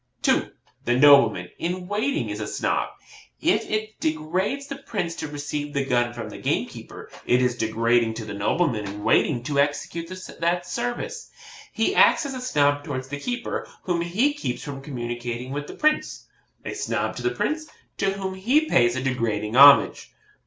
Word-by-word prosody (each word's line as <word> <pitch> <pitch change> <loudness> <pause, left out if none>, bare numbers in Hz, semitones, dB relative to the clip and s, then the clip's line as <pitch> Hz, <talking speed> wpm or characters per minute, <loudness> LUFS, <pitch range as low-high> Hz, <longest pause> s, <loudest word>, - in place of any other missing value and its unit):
2. - - +2 0.4
The 120 - +2
nobleman 125 -10 +6
in 180 +1 -3
waiting 205 - -1
is 105 - -5
a 105 - -4
Snob. - - -1 0.5
If - - +1
it 215 0 -3
degrades 180 - -1
the 275 -1 -6
Prince 180 -10 -4
to - - -4
receive 145 0 -5
the 140 -1 0
gun 120 -2 +1
from 120 -2 -6
the - - -9
gamekeeper, - - -4 0.2
it 125 - +4
is 125 -1 +1
degrading 115 0 +1
to 110 - -6
the 105 - -6
nobleman 105 - 0
in 100 +1 -7
waiting 120 +3 +2
to 140 +1 -1
execute 160 +4 -1 0.3
that 175 +1 0
service. 245 - -4 0.4
He - - 0
acts - - +5
as 275 - -4
a 255 - -5
Snob 145 - +2
towards 130 -2 -5
the 145 0 -5
keeper, 245 +7 -4
whom 175 -2 0
he 210 +12 +1
keeps 290 - -4
from 140 -2 -6
communication 120 -2 -5
with 145 +1 -4
the - - -9
Prince 305 0 0 0.4
a - - -4
Snob - - -2
to - - -5
the 370 - +1
Prince, 315 -4 -2 0.3
to 195 0 +1
whom 190 -1 -4
he 250 +12 +2
pays 120 - +3
a 130 - -2
degrading 115 -4 -1
homage. 140 +1 +7
145 Hz, 175 wpm, -24 LUFS, 120-195 Hz, 0.5 s, homage